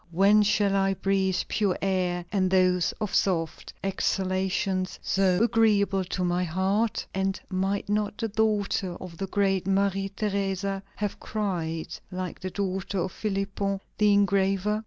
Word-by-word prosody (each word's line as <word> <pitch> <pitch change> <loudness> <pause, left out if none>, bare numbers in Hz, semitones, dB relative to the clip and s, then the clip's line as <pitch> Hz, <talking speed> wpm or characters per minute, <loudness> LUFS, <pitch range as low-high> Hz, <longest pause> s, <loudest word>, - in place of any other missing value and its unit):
when 200 +5 +5
shall 205 -1 +2
I 195 0 +2
breathe 190 0 +1
pure 200 -4 0
air 180 -2 0
and 190 -2 +2
those 185 -1 +3 0.2
soft 165 -4 0
exhalations 190 0 -1
so 190 +1 +2
agreeable 210 -4 +3
to 185 0 -3
my 175 0 +1
heart?" 190 +6 0
And 190 0 -1
might 195 +2 -1
not 210 0 -1
the 225 - -1
daughter 205 -4 0
of 175 -2 -9
the 195 - -2
great 195 -2 +1
Maria 195 0 +1
Theresa 195 -1 -2
have 205 -1 -3
cried, 170 -7 -3
like 185 -1 -5
the 185 - -4
daughter 195 0 -3
of 185 +1 -1
Philipon 195 -1 -2 0.2
the 210 -1 +5
engraver? 200 +1 +2
195 Hz, 135 wpm, -27 LUFS, 185-200 Hz, 0.2 s, when